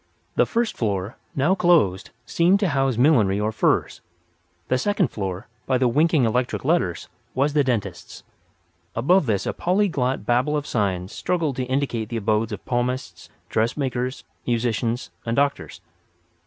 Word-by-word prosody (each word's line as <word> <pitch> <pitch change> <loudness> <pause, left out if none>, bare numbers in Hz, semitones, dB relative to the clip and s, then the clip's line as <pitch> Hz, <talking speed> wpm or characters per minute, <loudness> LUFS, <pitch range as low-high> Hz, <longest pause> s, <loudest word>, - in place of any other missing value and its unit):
The - - +3
first 235 -1 0
floor, 100 0 -2 0.2
now 145 +7 +3
closed, 125 - +2 0.2
seemed 175 +8 +3
to 195 - +2
house 135 -4 +1
millinery 115 -8 +4
or 105 +1 0
furs. 110 - 0 0.7
The 130 - +1
second 205 +2 +1
floor, 95 0 -5 0.2
by 130 - +2
the 125 0 +2
winking 150 +1 +3
electric 125 +3 -1
letters, 140 - 0 0.3
was 140 +2 +1
the 150 -1 +3
dentist's. 120 -6 -3 0.7
Above 150 +7 +3
this 100 -4 0
a - - -1
polyglot 170 -9 0
babel 130 +5 +2
of 145 - -3
signs 95 -6 -1
struggled 165 -7 -1
to 130 - -1
indicate 130 -4 -1
the 115 - -3
abodes 110 +1 0
of 105 - -7
palmists, 125 +1 -3 0.2
dressmakers, 125 +2 -1 0.2
musicians 120 0 -1
and 115 0 -2
doctors. 140 -10 -1
125 Hz, 145 wpm, -23 LUFS, 110-150 Hz, 0.7 s, millinery